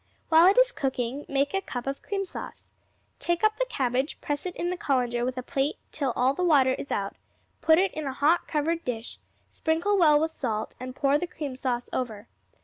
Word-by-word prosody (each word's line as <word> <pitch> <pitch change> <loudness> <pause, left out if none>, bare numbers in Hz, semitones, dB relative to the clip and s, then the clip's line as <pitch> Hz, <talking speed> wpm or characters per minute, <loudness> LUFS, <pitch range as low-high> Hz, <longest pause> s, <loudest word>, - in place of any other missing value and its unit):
While 330 +2 +7
it 390 - +5
is - - +6
cooking, 265 - -2
make 280 +1 +1
a 390 - +1
cup 245 -9 -5
of 275 0 -3
cream 395 -1 -2
sauce. - - -9 0.5
Take 345 +2 -1
up 430 0 +3
the - - +1
cabbage, 260 - -1
press 290 +4 -3
it 360 - -6
in 350 +1 -2
the - - -1
colander 245 -7 0
with 255 +1 -2
a 255 - -3
plate 275 +3 -1
till 275 -4 -1
all 255 +2 +3
the 360 - -2
water 275 -7 +5
is 275 - -6
out; 195 0 -2 0.5
put 320 0 +5
it 385 +2 +2
in 310 -2 -4
a 265 - -2
hot 305 +6 +2
covered 325 +2 0
dish, 235 -2 -5 0.3
sprinkle 340 +6 +1
well 305 -4 +6
with 320 +1 0
salt, 220 -7 -3
and 255 0 -7
pour 280 +1 +2
the 355 - -2
cream 290 -6 -5
sauce 250 -2 -2
over. 225 -4 -3
285 Hz, 215 wpm, -27 LUFS, 255-335 Hz, 0.5 s, While